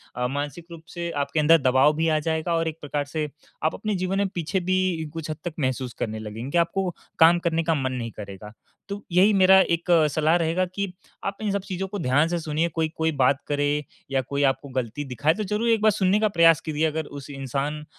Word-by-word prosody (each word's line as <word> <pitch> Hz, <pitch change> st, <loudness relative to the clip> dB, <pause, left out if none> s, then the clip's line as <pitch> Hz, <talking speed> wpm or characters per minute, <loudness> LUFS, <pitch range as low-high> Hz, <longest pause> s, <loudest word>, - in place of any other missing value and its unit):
अ, 125 Hz, 0 st, 0 dB
मानसिक 145 Hz, +5 st, -4 dB
रूप 165 Hz, -1 st, -9 dB
से 170 Hz, 0 st, -3 dB
आपके 145 Hz, 0 st, -1 dB
अंदर 160 Hz, +2 st, +6 dB
दबाव 130 Hz, +3 st, +4 dB
भी 160 Hz, +1 st, +1 dB
आ 155 Hz, -1 st, +2 dB
जाएगा। 160 Hz, +2 st, -1 dB
और 165 Hz, 0 st, 0 dB
एक 160 Hz, -1 st, -4 dB
प्रकार 145 Hz, 0 st, -2 dB
से 155 Hz, -2 st, -1 dB, 0.3 s
आप 155 Hz, -, +2 dB
अपने 215 Hz, 0 st, -2 dB
जीवन 185 Hz, +1 st, -1 dB
में 200 Hz, 0 st, +2 dB
पीछे 175 Hz, +3 st, -1 dB
भी 185 Hz, -3 st, 0 dB
कुछ 165 Hz, -1 st, -6 dB
हद 155 Hz, -, -5 dB
तक 175 Hz, -, -3 dB
महसूस 130 Hz, -3 st, -2 dB
करने 110 Hz, -1 st, -3 dB
लगेंगे 110 Hz, +5 st, -6 dB
कि 175 Hz, -, +1 dB
आपको 180 Hz, +2 st, +1 dB, 0.3 s
काम 165 Hz, +2 st, +7 dB
करने 165 Hz, -1 st, 0 dB
का 165 Hz, 0 st, +1 dB
मन 130 Hz, -3 st, -1 dB
नहीं 115 Hz, -2 st, -4 dB
करेगा। 100 Hz, 0 st, -8 dB, 0.4 s
तो 200 Hz, +1 st, -5 dB
यही 190 Hz, +5 st, +5 dB
मेरा 190 Hz, 0 st, +7 dB
एक 170 Hz, -1 st, -1 dB, 0.2 s
सलाह 155 Hz, +3 st, +2 dB
रहेगा 170 Hz, +2 st, +1 dB
कि 200 Hz, -2 st, -2 dB, 0.3 s
आप 195 Hz, 0 st, -3 dB
इन 210 Hz, -, 0 dB
सब 200 Hz, 0 st, -1 dB
चीज़ों 190 Hz, 0 st, -4 dB
को 205 Hz, +1 st, -5 dB
ध्यान 145 Hz, +1 st, +2 dB
से 175 Hz, 0 st, -1 dB
सुनिए, 160 Hz, +1 st, -1 dB
कोई 160 Hz, 0 st, -1 dB
कोई 160 Hz, 0 st, +1 dB
बात 135 Hz, +1 st, +3 dB
करे 145 Hz, 0 st, 0 dB, 0.3 s
या 135 Hz, -1 st, +2 dB
कोई 140 Hz, +2 st, -2 dB
आपको 135 Hz, +1 st, -10 dB
गलती 125 Hz, +4 st, -4 dB
दिखाए, 140 Hz, +4 st, +1 dB
तो 215 Hz, -, -3 dB
ज़रूर 210 Hz, +4 st, -1 dB
एक 225 Hz, -2 st, +3 dB
बार 215 Hz, 0 st, +5 dB
सुनने 195 Hz, 0 st, +2 dB
का 215 Hz, -, +4 dB
प्रयास 165 Hz, -4 st, +5 dB
कीजिए, 155 Hz, 0 st, -1 dB
अगर 155 Hz, 0 st, -3 dB
उस 145 Hz, -1 st, -9 dB
इंसान 140 Hz, +2 st, -3 dB
160 Hz, 230 wpm, -24 LUFS, 140-180 Hz, 0.4 s, काम